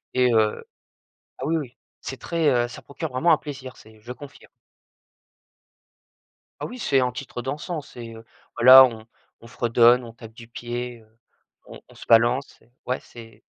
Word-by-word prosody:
et 125 -1 +3
heu 110 -1 +1 0.7
ah 130 - -5
oui, 165 +2 +1
oui 130 -6 -6 0.2
c'est 135 - -7
très, 165 -3 0
heu, 120 -2 +1
ça - - -10
procure 155 +3 -7
vraiment 130 +7 +2
un - - +5
plaisir 135 -4 -9
c'est 110 0 -18
je 120 +3 -8
confirme. 145 +2 -14 2.1
Ah - - -1
oui, 250 - -9
c'est 140 - +1
un 125 -1 0
titre 125 0 -7
dansant 150 +5 -5
c'est, 120 -4 -11
heu, 115 0 -12 0.3
voilà, 130 +2 +9
on 115 -3 -7 0.3
on 115 - -13
fredonne, 120 +1 +3
on 115 - -11
tape 115 -1 -13
du 115 -1 -13
pied, 120 +1 -6
heu, 110 - -24 0.6
on - - -13
on - - -17
se - - -13
balance 120 +4 +2
et 120 - -29
ouais, 125 - -1
c'est 115 -1 -14
125 Hz, 175 wpm, -23 LUFS, 115-135 Hz, 2.1 s, voilà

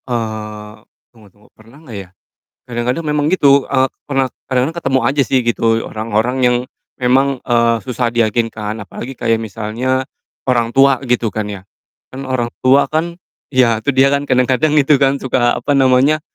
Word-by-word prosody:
Eee, 110 -3 -4 0.4
tunggu 110 -3 -19
tunggu. 105 +3 -25
Pernah 115 +5 -19
nggak 115 -7 -8
ya, 95 -2 -8 0.6
kadang-kadang 125 +6 -2
memang 150 -1 0
gitu, 140 -6 +4
eee, 130 -1 +2 0.2
pernah 135 -2 0 0.2
kadang-kadang 130 +5 0
ketemu 135 -1 +2
aja 140 +1 +1
sih 130 0 +1
gitu 120 -1 0 0.2
orang-orang 110 +3 -1
yang 125 0 +4 0.4
memang, 130 +1 +2
eee, 115 -1 +3
susah 125 -1 -2
diyakinkan 110 -2 -1
apalagi 120 +7 -8
kayak 115 -2 0
misalnya 115 +5 -2 0.4
orang 120 -2 0
tua 135 -1 +5
gitu 120 -2 0
kan 105 +1 -3
ya. 100 -2 -7 0.5
Kan 135 +1 -7
orang 120 -2 -1
tua 135 +2 +3
kan 165 +2 -1 0.3
ya, 120 -5 +2
itu 140 +4 -2
dia 135 +1 +4
kan, 140 0 -1
kadang-kadang 130 +4 +2
gitu 145 -1 +4
kan, 135 0 +3
suka, 125 -2 0
apa 145 - -1
namanya, 135 +3 +3
125 Hz, 160 wpm, -16 LUFS, 115-135 Hz, 0.6 s, tua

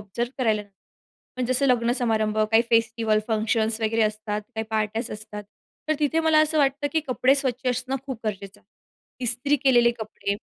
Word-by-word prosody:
Observe 235 +5 -4
करायला 220 -4 +1
नाही. 205 - -22 0.6
पण 255 - -1
जसं 255 +2 +2
लग्नसमारंभ, 235 -3 +1
काही 225 +2 +4
फेस्टिव्हल, 230 -1 +2
फंक्शन्स 220 0 0
वगैरे 225 +1 +1
असतात, 215 0 -2
काही 220 0 -2
पार्ट्याज 220 +1 -1
असतात. 210 0 -7 0.5
तर 310 - +3
तिथे 310 +2 +1
मला 320 -1 +3
असं 310 0 0
वाटतं, 280 0 +1
की 320 - +2
कपडे 255 +1 +3
स्वच्छ 260 -2 -2
असणं 255 +2 -2
खूप 260 -5 -5
गरजेचं 200 -2 -5
आहे. - - -38 0.6
इस्त्री 250 +5 +1
केलेले 240 -3 +5
कपडे. 210 -2 -3
230 Hz, 165 wpm, -24 LUFS, 215-260 Hz, 0.6 s, केलेले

